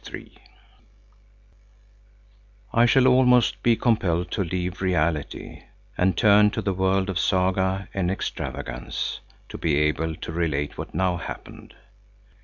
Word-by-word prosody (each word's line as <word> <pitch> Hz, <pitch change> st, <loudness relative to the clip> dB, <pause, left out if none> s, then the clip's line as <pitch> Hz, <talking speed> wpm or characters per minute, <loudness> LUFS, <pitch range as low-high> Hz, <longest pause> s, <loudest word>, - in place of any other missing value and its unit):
III -, -, -10 dB, 2.4 s
I 120 Hz, +1 st, +5 dB
shall 130 Hz, +2 st, +4 dB
almost 125 Hz, -2 st, +4 dB
be 120 Hz, -1 st, +3 dB
compelled 95 Hz, -8 st, 0 dB
to 100 Hz, -, -1 dB
leave 90 Hz, +1 st, -4 dB
reality, 85 Hz, -5 st, -2 dB, 0.3 s
and 90 Hz, -1 st, +1 dB
turn 105 Hz, +1 st, +5 dB
to -, -, -3 dB
the 95 Hz, 0 st, 0 dB
world 95 Hz, +1 st, +1 dB
of 95 Hz, -2 st, -2 dB
saga 95 Hz, +1 st, +1 dB
and 90 Hz, -2 st, -1 dB
extravagance -, -, -4 dB, 0.3 s
to -, -, -9 dB
be 80 Hz, -3 st, +1 dB
able 75 Hz, +2 st, 0 dB
to 85 Hz, -, -7 dB
relate 75 Hz, -4 st, -2 dB
what -, -, -8 dB
now 90 Hz, -2 st, +1 dB
happened. -, -, -9 dB
95 Hz, 125 wpm, -24 LUFS, 85-100 Hz, 2.4 s, I